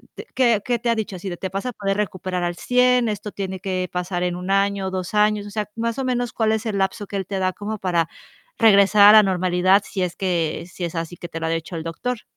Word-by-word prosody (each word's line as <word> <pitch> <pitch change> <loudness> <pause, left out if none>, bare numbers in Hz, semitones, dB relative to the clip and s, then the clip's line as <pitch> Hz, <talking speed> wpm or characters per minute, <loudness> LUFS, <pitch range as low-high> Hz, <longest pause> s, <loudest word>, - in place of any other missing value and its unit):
te - - -8
¿qué 235 -5 +3
qué 245 -1 0
te 235 +1 -1
ha 230 - +3
dicho? 215 -3 -4
Así 185 +2 -6
de: 175 - -6
"Te 190 - -4
vas 195 +4 -4
a - - -1
poder 195 -2 -2
recuperar 185 -3 -2
al 175 0 -1
100, 250 +3 +3
esto 210 -1 -4
tiene 190 -1 -5
que 185 -1 -2
pasar 180 0 -2
en 180 -1 -1
1 180 +1 -6
año, 195 -1 +1
2 185 0 -4
años". 210 0 +2
O - - -9
sea, 210 0 -3
más 230 +2 -2
o - - -1
menos, 245 -1 -1
¿cuál 220 -1 +1
es 220 +1 -2
el 215 -3 -2
lapso 195 +2 -1
que 200 - -4
él 190 - -3
te 195 -1 -3
da 185 -1 0
como 215 +1 -5
para 175 -4 0 0.5
regresar 205 -1 +6
a - - +10
la - - +5
normalidad, 185 +1 +2
si 195 - -4
es 175 -1 -3
que, 170 -4 -1
si 175 - -4
es 170 - -6
así 165 +1 -4
que 175 - -7
te 165 - -6
lo 165 - -3
ha - - -1
dicho 165 +1 -3
el 160 - -4
doctor? 210 +7 -4
195 Hz, 270 wpm, -22 LUFS, 180-215 Hz, 0.5 s, a